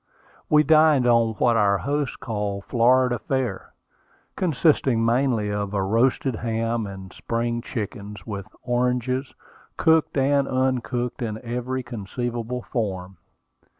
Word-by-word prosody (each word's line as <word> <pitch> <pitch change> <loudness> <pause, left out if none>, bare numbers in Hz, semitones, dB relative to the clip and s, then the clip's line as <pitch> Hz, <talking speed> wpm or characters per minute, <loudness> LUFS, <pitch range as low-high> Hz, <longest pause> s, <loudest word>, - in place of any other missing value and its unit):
We 150 0 +5
dined 155 -3 +5
on 115 -2 +3
what 120 +1 +2
our 100 -2 +3
host 145 +4 -2
called 105 -5 -3
Florida 125 0 +3
fare, 130 -5 -3 0.6
consisting 140 -8 +2
mainly 115 -3 +1
of 105 0 -3
a 100 - +1
roasted 115 +4 +1
ham 115 -1 -1
and 95 -1 -9
spring 120 0 -2
chickens, 105 -3 -6
with 100 -3 -6 0.2
oranges, 125 +2 -1 0.4
cooked 160 -2 +3
and 140 0 +2
uncooked, 130 -1 -1
in 110 -3 -3
every 125 +2 -3
conceivable 120 +1 -4
form. 95 -5 -4
120 Hz, 115 wpm, -24 LUFS, 110-130 Hz, 0.6 s, We